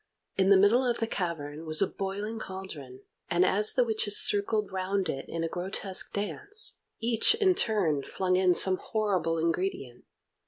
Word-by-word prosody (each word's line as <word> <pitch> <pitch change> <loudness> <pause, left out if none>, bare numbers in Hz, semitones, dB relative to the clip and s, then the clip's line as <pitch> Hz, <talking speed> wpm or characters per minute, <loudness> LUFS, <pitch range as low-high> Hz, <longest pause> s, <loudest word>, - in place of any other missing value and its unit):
In 190 0 +2
the 200 - +7
middle 205 +7 +4
of 245 -2 0
the 225 - -1
cavern 165 -6 -5
was 155 0 -4
a 195 - +3
boiling 200 +4 -5
cauldron, 160 -11 -9 0.3
and 175 +1 +2
as 210 +2 +3
the 250 - +3
witches 220 -3 +1
circled 210 +1 +2
round 190 0 -2
it 135 - -4
in 165 0 -3
a - - -1
grotesque 185 +2 -2
dance, 410 - -2 0.2
each 230 - +3
in 400 -4 +3
turn 205 - +1
flung 185 +5 -1
in 185 -1 +3
some 185 +1 +4
horrible 185 -8 -1
ingredient. 165 -7 -3
190 Hz, 165 wpm, -28 LUFS, 170-215 Hz, 0.3 s, the